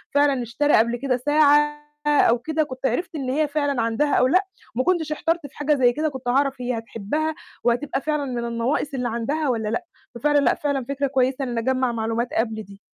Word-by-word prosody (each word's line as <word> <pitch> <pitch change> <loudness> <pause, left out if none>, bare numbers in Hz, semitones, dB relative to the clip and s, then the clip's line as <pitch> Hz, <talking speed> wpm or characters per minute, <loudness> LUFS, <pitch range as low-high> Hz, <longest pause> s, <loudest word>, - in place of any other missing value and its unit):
فعلًا 280 -3 +3
اشترى 265 +6 0
قبل 235 +2 +4
كده 255 0 0
ساعة 295 +2 +3 0.2
أو 265 -5 +4
كده، 315 +4 0
كنت 260 -2 -7
عرفت 325 +7 -2
إن 270 -3 -3
هي 300 +4 +1
فعلًا 285 -4 0
عندها 230 +6 +1
أو 250 - +4
لأ، 370 +8 +3 0.3
وما 255 - +1
كنتش 340 -4 +1
احترت 325 0 -1
في - - -21
حاجة 295 +1 +2
زي 245 -3 +3
كده، 310 +3 0
كنت 265 -3 -8
هاعرف 270 +1 +1
هي 245 -1 -1
هتحبَّها 230 +8 -3 0.3
وهتبقى 270 +3 0
فعلًا 300 -2 -1
من 245 -3 -3
النواقِص 235 +5 -1
اللي 250 -2 -1
عندها 275 +6 -1
والّا 225 -3 -1
لأ. 350 +11 -2 0.3
ففعلًا 290 +5 +2
لأ، 280 - +3
فعلًا 285 -5 -2
فكرة 280 0 0
كويسة 265 0 +1
إن 245 -3 -3
أجمَّع 255 +2 +1
معلومات 230 +1 -1
قبل 220 -1 -1
دي. 200 -1 -14
270 Hz, 205 wpm, -23 LUFS, 240-295 Hz, 0.3 s, قبل